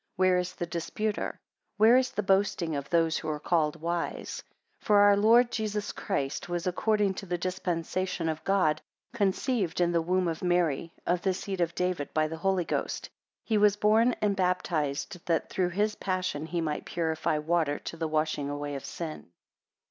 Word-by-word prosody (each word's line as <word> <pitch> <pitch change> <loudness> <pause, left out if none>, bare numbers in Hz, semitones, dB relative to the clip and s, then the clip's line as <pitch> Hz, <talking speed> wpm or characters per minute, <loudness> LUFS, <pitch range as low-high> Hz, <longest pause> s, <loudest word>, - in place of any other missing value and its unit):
Where 185 -1 +3
is 180 0 -4
the 175 - -3
disputer? 190 +6 -3 0.4
Where 220 +3 +7
is 260 0 +3
the 210 - -3
boasting 190 -4 +1
of 140 -1 -4
those 165 -2 +2
who 155 - -5
are 150 -1 -2
called 160 -1 +1
wise? 170 +1 -3 0.4
9 - - -24
For 210 - +5
our 205 0 +7
Lord 230 +4 +5
Jesus 210 -2 -2
Christ 145 -4 -3
was 175 +1 -2
according 205 +2 +1
to 195 +1 -8
the 175 0 -1
dispensation 180 0 -2
of 160 0 -3
God, 170 -6 +2 0.3
conceived 200 -3 0
in 175 -1 +3
the 170 -1 +2
womb 180 +2 +1
of 165 -1 -3
Mary, 170 -3 +1
of 175 0 +1
the 190 -2 +1
seed 190 -1 -4
of 170 0 0
David, 180 -6 -1
by 155 0 +3
the 160 +1 -6
Holy 185 0 +1
Ghost. - - -3 0.3
He 220 -2 +1
was 205 -1 +5
born 220 +4 +3
and 205 -1 +2
baptized, 175 -4 -1
that 165 -2 0
through 180 -2 +1
his 210 +4 0
passion 185 -6 -2
he 170 0 -2
might 150 -2 -2
purify 160 -2 -1
water, 155 -1 +1
to - - -7
the 165 -1 -2
washing 155 -2 -1
away 145 0 -4
of 140 - -5
sin. 160 - -6
175 Hz, 185 wpm, -29 LUFS, 160-195 Hz, 0.4 s, Where